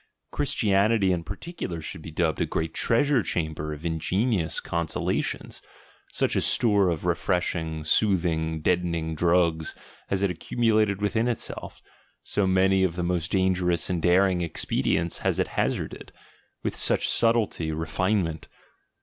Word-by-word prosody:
Christianity 105 Hz, -6 st, +2 dB
in 85 Hz, -2 st, -1 dB
particular 100 Hz, -, -6 dB
should 80 Hz, 0 st, -7 dB
be 80 Hz, -, -8 dB
dubbed 80 Hz, 0 st, -1 dB
a -, -, +1 dB
great 80 Hz, 0 st, -2 dB
treasure 130 Hz, +6 st, +2 dB
chamber 80 Hz, -5 st, -3 dB
of 75 Hz, +2 st, -7 dB
ingenious 85 Hz, +2 st, 0 dB
consolations, 85 Hz, -2 st, -2 dB, 0.2 s
— -, -, -28 dB
such -, -, 0 dB
a -, -, +2 dB
store 100 Hz, -5 st, +3 dB
of 85 Hz, -1 st, -3 dB
refreshing, 85 Hz, -3 st, -1 dB
soothing, 80 Hz, -4 st, +1 dB
deadening 85 Hz, -2 st, 0 dB
drugs 85 Hz, -1 st, +1 dB, 0.3 s
has 100 Hz, 0 st, -1 dB
it 100 Hz, -, +2 dB
accumulated 105 Hz, +2 st, +1 dB
within 110 Hz, +3 st, +1 dB
itself; 120 Hz, -2 st, -5 dB, 0.4 s
so 100 Hz, -2 st, 0 dB
many 95 Hz, +1 st, +3 dB
of 90 Hz, -3 st, 0 dB
the 90 Hz, -, -2 dB
most 85 Hz, -1 st, -1 dB
dangerous 90 Hz, -3 st, +1 dB
and 90 Hz, -2 st, -1 dB
daring 90 Hz, 0 st, +3 dB
ex 85 Hz, -, -2 dB
pedients 85 Hz, 0 st, 0 dB
has -, -, 0 dB
it -, -, 0 dB
hazarded; -, -, -3 dB, 0.5 s
with -, -, -1 dB
such -, -, +3 dB
subtlety, 115 Hz, -8 st, +1 dB
refinement. 80 Hz, +2 st, -1 dB
90 Hz, 140 wpm, -26 LUFS, 80-100 Hz, 0.5 s, store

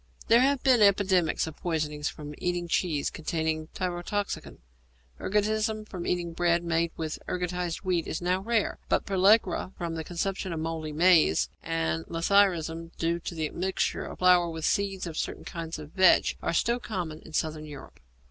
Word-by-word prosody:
There 235 Hz, +1 st, +7 dB
have 275 Hz, 0 st, +2 dB
been 255 Hz, -4 st, +5 dB
epidemics 190 Hz, -4 st, +3 dB
of 160 Hz, -1 st, -8 dB
poisoning 155 Hz, -3 st, -2 dB
from 150 Hz, 0 st, -4 dB
eating 175 Hz, -1 st, -1 dB
cheese 165 Hz, -4 st, 0 dB
containing 160 Hz, -1 st, -2 dB
tyrotoxicon. 185 Hz, +3 st, -3 dB, 0.6 s
Ergotism 215 Hz, +1 st, 0 dB
from 180 Hz, -4 st, -6 dB
eating 175 Hz, -2 st, -1 dB
bread 170 Hz, 0 st, +2 dB
made 170 Hz, 0 st, 0 dB
with 160 Hz, -1 st, -4 dB
ergotized 180 Hz, -1 st, -2 dB
wheat 180 Hz, -3 st, 0 dB
is -, -, -3 dB
now 180 Hz, +1 st, 0 dB
rare, 225 Hz, +1 st, 0 dB
but -, -, +1 dB
pellagra 195 Hz, -1 st, +3 dB
from 170 Hz, -2 st, -3 dB
the 160 Hz, -1 st, -4 dB
consumption 185 Hz, +3 st, -3 dB
of 160 Hz, -, -3 dB
mouldy 160 Hz, -1 st, -3 dB
maize, 160 Hz, -, +4 dB
and 80 Hz, 0 st, -1 dB
lathyrism, 165 Hz, -2 st, +1 dB
due 170 Hz, +1 st, 0 dB
to 170 Hz, -, -6 dB
the 160 Hz, -1 st, -1 dB
admixture 185 Hz, +5 st, -2 dB
with -, -, -9 dB
flour 180 Hz, -1 st, +5 dB
of 165 Hz, -, -6 dB
the 160 Hz, -, -6 dB
seeds 195 Hz, 0 st, 0 dB
of 165 Hz, -2 st, -6 dB
certain -, -, -4 dB
kinds 165 Hz, -1 st, -5 dB
of 150 Hz, -1 st, -10 dB
vetch, 185 Hz, -1 st, +4 dB
are -, -, -1 dB
still 235 Hz, +8 st, +1 dB
common 175 Hz, -9 st, -4 dB
in 160 Hz, -, -14 dB
Southern 155 Hz, 0 st, -2 dB
Europe. 145 Hz, -3 st, -11 dB
175 Hz, 170 wpm, -28 LUFS, 160-190 Hz, 0.6 s, There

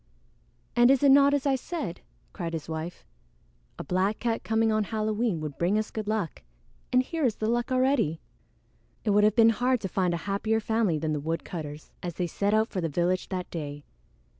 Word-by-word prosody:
"And 240 Hz, +1 st, +6 dB
is 270 Hz, 0 st, +4 dB
it 280 Hz, -, +7 dB
not 280 Hz, +1 st, +7 dB
as 285 Hz, -1 st, 0 dB
I 280 Hz, -, +3 dB
said?" 260 Hz, -, -5 dB, 0.3 s
cried 170 Hz, -4 st, -4 dB
his 160 Hz, -2 st, -4 dB
wife. 160 Hz, +2 st, -5 dB, 0.7 s
"A -, -, -5 dB
black 185 Hz, +6 st, 0 dB
cat 230 Hz, -1 st, -2 dB
coming 225 Hz, 0 st, +2 dB
on 215 Hz, -1 st, +1 dB
Halloween 215 Hz, -2 st, -1 dB
would 150 Hz, -2 st, -6 dB
bring 180 Hz, +5 st, +2 dB
us 215 Hz, 0 st, -2 dB
good 215 Hz, -2 st, -5 dB
luck, 210 Hz, -, -2 dB, 0.5 s
and 255 Hz, 0 st, +4 dB
here 325 Hz, +4 st, -3 dB
is 235 Hz, -5 st, +2 dB
the 215 Hz, -, -3 dB
luck 240 Hz, +2 st, 0 dB
already!" 255 Hz, -, +2 dB, 0.9 s
It 210 Hz, -, +2 dB
would 205 Hz, +1 st, +4 dB
have 210 Hz, 0 st, +4 dB
been 230 Hz, -1 st, +7 dB
hard 250 Hz, +3 st, +1 dB
to 195 Hz, -, -2 dB
find 180 Hz, -1 st, 0 dB
a 170 Hz, -, -7 dB
happier 210 Hz, +3 st, 0 dB
family 220 Hz, -6 st, +1 dB
than 155 Hz, 0 st, -1 dB
the 150 Hz, -, -1 dB
woodcutter's 155 Hz, -1 st, -5 dB
as 175 Hz, -3 st, -5 dB
they 180 Hz, -, -1 dB
set 200 Hz, +4 st, -1 dB
out 220 Hz, +1 st, +2 dB
for 185 Hz, -, -3 dB
the 165 Hz, -, -1 dB
village 175 Hz, +4 st, 0 dB
that 185 Hz, -2 st, -4 dB
day. 145 Hz, -3 st, -5 dB
210 Hz, 205 wpm, -27 LUFS, 170-230 Hz, 0.9 s, it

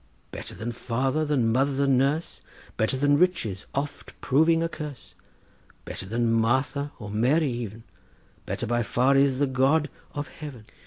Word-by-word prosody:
Better -, -, -7 dB
than 115 Hz, +3 st, -4 dB
father, 130 Hz, +5 st, -1 dB
than 130 Hz, -7 st, +2 dB
mother, 135 Hz, +3 st, +2 dB
than 135 Hz, -1 st, +3 dB
nurse, 140 Hz, +6 st, 0 dB, 0.3 s
Better 110 Hz, +4 st, 0 dB
than 145 Hz, +1 st, +3 dB
riches, 115 Hz, -, +1 dB
oft 145 Hz, +1 st, -4 dB
proving 160 Hz, +4 st, +3 dB
a -, -, +1 dB
curse, 150 Hz, -6 st, -8 dB, 0.7 s
Better 95 Hz, -, -6 dB
than 115 Hz, +2 st, +1 dB
Martha 130 Hz, +5 st, +1 dB
or 105 Hz, -3 st, -7 dB
Mary 130 Hz, +7 st, +2 dB
even— 115 Hz, -2 st, -5 dB, 0.6 s
Better -, -, -2 dB
by 120 Hz, +1 st, +1 dB
far 125 Hz, +4 st, +2 dB
is 135 Hz, -1 st, +4 dB
the 145 Hz, -, +3 dB
God 140 Hz, +4 st, +2 dB, 0.2 s
of 145 Hz, 0 st, -3 dB
heaven. 145 Hz, -9 st, -9 dB
135 Hz, 155 wpm, -26 LUFS, 120-145 Hz, 0.7 s, is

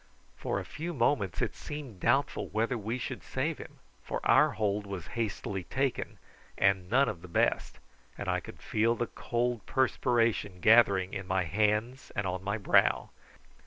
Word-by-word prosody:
For -, -, -2 dB
a -, -, -6 dB
few 170 Hz, +3 st, -5 dB
moments 115 Hz, -, +1 dB
it -, -, -2 dB
seemed 140 Hz, -10 st, -7 dB
doubtful 130 Hz, +8 st, +1 dB
whether 115 Hz, +4 st, 0 dB
we 115 Hz, +2 st, -3 dB
should 125 Hz, -, -5 dB
save -, -, -2 dB
him, -, -, -10 dB, 0.3 s
for -, -, -3 dB
our -, -, +5 dB
hold 105 Hz, -1 st, -1 dB
was 95 Hz, -4 st, -5 dB
hastily 100 Hz, -4 st, -3 dB
taken 135 Hz, 0 st, -2 dB, 0.4 s
and 95 Hz, -2 st, +2 dB
none 135 Hz, +5 st, +4 dB
of 85 Hz, -, -4 dB
the 90 Hz, -, -10 dB
best, 85 Hz, -, 0 dB, 0.4 s
and -, -, -5 dB
I -, -, +1 dB
felt 115 Hz, +2 st, -1 dB
the 120 Hz, -, 0 dB
cold 120 Hz, 0 st, -2 dB
perspiration 115 Hz, -7 st, +1 dB
gathering 100 Hz, -3 st, +5 dB
in 95 Hz, -2 st, -5 dB
my 95 Hz, 0 st, +1 dB
hands 105 Hz, +7 st, 0 dB
and 100 Hz, -, -1 dB
on 90 Hz, 0 st, -3 dB
my 100 Hz, +2 st, -1 dB
brow. 100 Hz, -, +3 dB
110 Hz, 160 wpm, -30 LUFS, 95-120 Hz, 0.4 s, our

